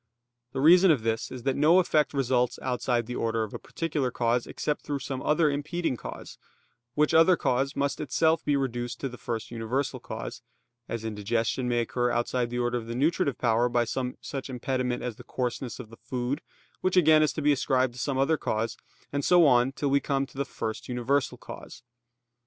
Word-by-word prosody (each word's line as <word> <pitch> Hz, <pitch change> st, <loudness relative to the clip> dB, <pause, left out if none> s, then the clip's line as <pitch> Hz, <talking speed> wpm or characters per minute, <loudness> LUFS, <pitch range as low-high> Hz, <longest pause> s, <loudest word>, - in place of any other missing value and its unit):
The 135 Hz, -, -2 dB
reason 180 Hz, +5 st, +7 dB
of 140 Hz, -9 st, +3 dB
this 115 Hz, 0 st, -1 dB
is 125 Hz, -2 st, -7 dB
that 135 Hz, 0 st, +1 dB
no 155 Hz, +5 st, +5 dB
effect 155 Hz, -5 st, +3 dB
results 125 Hz, -3 st, +1 dB
outside 125 Hz, -2 st, 0 dB
the 125 Hz, +2 st, -5 dB
order 115 Hz, 0 st, 0 dB
of 110 Hz, -, -6 dB
a -, -, -5 dB
particular 150 Hz, -6 st, -2 dB
cause, 120 Hz, 0 st, 0 dB
except 150 Hz, -, -2 dB
through 145 Hz, -1 st, -3 dB
some 135 Hz, -1 st, -5 dB
other 155 Hz, +2 st, +3 dB
impeding 155 Hz, +1 st, -2 dB
cause; -, -, -9 dB, 0.6 s
which 150 Hz, 0 st, +2 dB
other 165 Hz, +3 st, +6 dB
cause 135 Hz, +3 st, 0 dB
must 140 Hz, 0 st, -1 dB
itself 160 Hz, +2 st, +2 dB
be 145 Hz, -, +1 dB
reduced 120 Hz, -3 st, -3 dB
to 135 Hz, -, -2 dB
the 125 Hz, -, -11 dB
first 115 Hz, -1 st, -4 dB
universal 120 Hz, +4 st, -2 dB
cause; -, -, -7 dB, 0.5 s
as 115 Hz, -1 st, -4 dB
indigestion 115 Hz, +3 st, -1 dB
may 120 Hz, -1 st, +2 dB
occur 125 Hz, +1 st, 0 dB
outside 120 Hz, 0 st, 0 dB
the 120 Hz, -, -4 dB
order 120 Hz, 0 st, 0 dB
of 115 Hz, -, -10 dB
the 115 Hz, -, -4 dB
nutritive 145 Hz, +1 st, +1 dB
power 120 Hz, 0 st, +2 dB
by 120 Hz, 0 st, +2 dB
some 125 Hz, +2 st, -3 dB
such 135 Hz, -1 st, -6 dB
impediment 125 Hz, 0 st, -2 dB
as 125 Hz, -3 st, -4 dB
the -, -, -11 dB
coarseness 125 Hz, 0 st, -3 dB
of 115 Hz, -3 st, -9 dB
the 115 Hz, -, -12 dB
food, 125 Hz, +3 st, -3 dB, 0.4 s
which 185 Hz, 0 st, 0 dB
again 155 Hz, -3 st, +6 dB
is 155 Hz, -, +3 dB
to 155 Hz, -, -3 dB
be 150 Hz, -, +5 dB
ascribed 130 Hz, -2 st, +1 dB
to 125 Hz, -, -10 dB
some 135 Hz, +1 st, -1 dB
other 145 Hz, +4 st, +2 dB
cause, 115 Hz, -1 st, -2 dB, 0.4 s
and 140 Hz, 0 st, -1 dB
so 175 Hz, +1 st, +6 dB
on 125 Hz, -1 st, +4 dB
till 140 Hz, 0 st, -2 dB
we 140 Hz, -, +4 dB
come 140 Hz, -1 st, -1 dB
to 135 Hz, -, -20 dB
the 140 Hz, +1 st, -1 dB
first 110 Hz, 0 st, -5 dB
universal 125 Hz, +3 st, 0 dB
cause. -, -, -10 dB
130 Hz, 205 wpm, -27 LUFS, 120-145 Hz, 0.6 s, reason